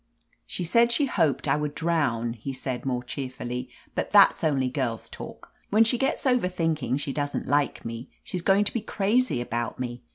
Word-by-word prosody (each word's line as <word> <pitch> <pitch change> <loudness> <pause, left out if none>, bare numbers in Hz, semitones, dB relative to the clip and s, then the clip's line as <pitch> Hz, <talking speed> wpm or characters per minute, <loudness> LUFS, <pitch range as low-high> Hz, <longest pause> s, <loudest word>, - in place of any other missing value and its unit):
"She 180 - -3
said 235 +8 +4
she 285 +5 +3
hoped 165 - +1
I - - +4
would 150 -1 -2
drown," 140 -9 0
he 120 +4 -6
said, 130 0 -4
more 125 -2 -1
cheerfully, 125 -1 -5 0.2
"but - - -2
that's - - +6
only 140 -5 +2
girl's 125 -4 -2
talk. - - -10 0.2
When 215 +2 +6
she 230 +2 +2
gets 270 - 0
over 250 -7 +3
thinking 155 -8 0
she 140 -1 -3
doesn't 145 -1 -2
like 145 0 +1
me, 115 +3 -6
she's 180 - -4
going 195 +3 +4
to 205 - -2
be 235 - -1
crazy 210 - +1
about 120 0 -3
me. 120 -1 -4
145 Hz, 190 wpm, -26 LUFS, 125-195 Hz, 0.2 s, that's